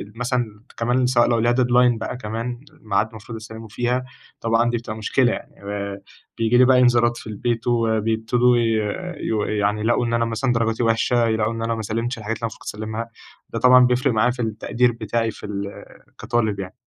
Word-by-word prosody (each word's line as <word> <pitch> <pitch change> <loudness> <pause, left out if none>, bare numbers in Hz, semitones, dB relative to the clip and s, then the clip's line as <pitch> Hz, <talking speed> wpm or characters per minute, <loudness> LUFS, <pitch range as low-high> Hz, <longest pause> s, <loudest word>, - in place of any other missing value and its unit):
مثلًا 120 -3 -2 0.2
كمان 120 +2 +1
سواء 120 -1 +3
لو 120 -1 +2
ليها 120 +2 +3
deadline 125 -1 +3
بقى 110 - -4
كمان 115 +1 -4 0.2
ميعاد 105 0 0
المفروض 115 +1 -10
أسلِّمه 110 0 -9
فيها، 125 +4 -1 0.4
طبعًا 115 +1 +2
دي 120 - 0
بتبقى 110 -2 -6
مشكلة 120 +3 +2
يعني. - - -8
آآ 100 0 -5 0.4
بييجي 115 +1 +2
لي 125 - +7
بقى 130 0 +5
إنذارات 120 -1 +4
في - - -10
البيت 115 +2 -2
وبيبتدوا 115 +1 +2
ي - - +2 0.7
يو 110 -2 0
يعني 105 0 0
يلاقوا 120 +2 +1
إن 115 - -2
أنا 115 0 +2
مثلًا، 115 +3 0
درجاتي 115 0 0
وحشة، 115 +1 +2
يلاقوا 110 0 0
إن 115 - -5
أنا 115 0 -1
ما 110 - -4
سلِّمتش 115 +4 -2
الحاجات 110 0 -4
اللي - - -22
أنا - - +1
المفروض 110 - -12
كنت - - -6
أسلِّمها، 110 +2 -5 0.4
ده 115 - -4
طبعًا 125 +1 +7
بيفرِق 125 +1 +2
معايا 115 +3 +3
في 125 0 -5
التقدير 115 +2 0
بتاعي 115 0 -2
في - - -11
ال 100 -1 -6 0.3
كطالب 110 -3 -1
يعني. 95 -1 -6
115 Hz, 200 wpm, -22 LUFS, 110-120 Hz, 0.7 s, لي